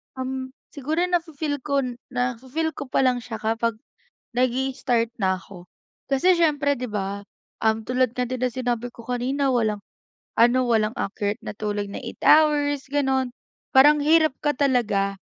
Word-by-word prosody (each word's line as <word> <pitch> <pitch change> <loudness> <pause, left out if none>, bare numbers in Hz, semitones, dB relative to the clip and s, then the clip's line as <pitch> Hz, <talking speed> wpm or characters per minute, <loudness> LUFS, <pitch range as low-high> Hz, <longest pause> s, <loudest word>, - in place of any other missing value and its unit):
Um, 260 0 -4 0.2
siguro 305 +5 -1
nafi-feel 320 -5 -1
kon 265 -3 -1 0.2
nafi-feel 255 +6 -2
ko 280 -2 -7
pa 265 - +1
lang 250 -1 +2
siya 230 -2 -7
kapag 225 +1 0 0.6
nag-i-start 255 -2 +1
na 190 -3 +1
ako. 180 -3 -13 0.5
Kasi 345 +7 +4
siyempre 290 -4 +2
'di 245 -2 -5
ba, 200 -1 -3 0.4
um, 220 0 +2
tulad 255 -1 +1
nga 250 0 -1
din 255 -1 -4
ng 250 - +1
sinabi 245 -1 -2
ko 235 - -13
kanina, 260 +3 0
walang 220 -5 +1 0.6
ano, 245 +2 +4
walang 220 -1 +2
accurate 205 +2 -2
na 210 - -7
tulog 205 -1 -3
na 200 - -7
8 235 - -8
hours 290 -2 +4
gano'n. 265 -3 +1 0.4
Parang 290 +2 +6
hirap 315 -2 +4
ka 295 - +3
talaga 230 -8 +1
255 Hz, 155 wpm, -24 LUFS, 230-285 Hz, 0.6 s, Parang